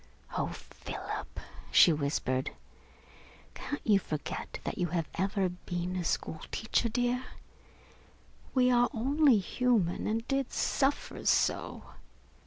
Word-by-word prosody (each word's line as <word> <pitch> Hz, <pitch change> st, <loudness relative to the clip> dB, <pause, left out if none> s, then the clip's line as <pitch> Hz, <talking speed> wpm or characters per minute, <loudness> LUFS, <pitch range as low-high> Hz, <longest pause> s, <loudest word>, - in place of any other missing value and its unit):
"Oh, -, -, 0 dB
Philip," -, -, -7 dB, 0.3 s
she 170 Hz, -, +7 dB
whispered, 140 Hz, -3 st, -1 dB, 1.0 s
"can't 290 Hz, -, -5 dB
you 205 Hz, -3 st, +5 dB
forget 155 Hz, -5 st, -5 dB
that -, -, -4 dB
you 175 Hz, -, +1 dB
have 165 Hz, -2 st, -1 dB
ever 195 Hz, +1 st, +1 dB
been 180 Hz, 0 st, -4 dB
a 180 Hz, -, -1 dB
school 160 Hz, -1 st, -2 dB
teacher, 220 Hz, +1 st, 0 dB
dear? 245 Hz, +2 st, 0 dB, 1.3 s
We 250 Hz, -1 st, +5 dB
are 245 Hz, 0 st, +4 dB
only 275 Hz, +2 st, +4 dB
human, 205 Hz, -2 st, +1 dB
and 225 Hz, +2 st, -1 dB
did 275 Hz, -2 st, 0 dB
suffer 275 Hz, +1 st, 0 dB
so. -, -, +2 dB
210 Hz, 115 wpm, -31 LUFS, 175-250 Hz, 1.3 s, she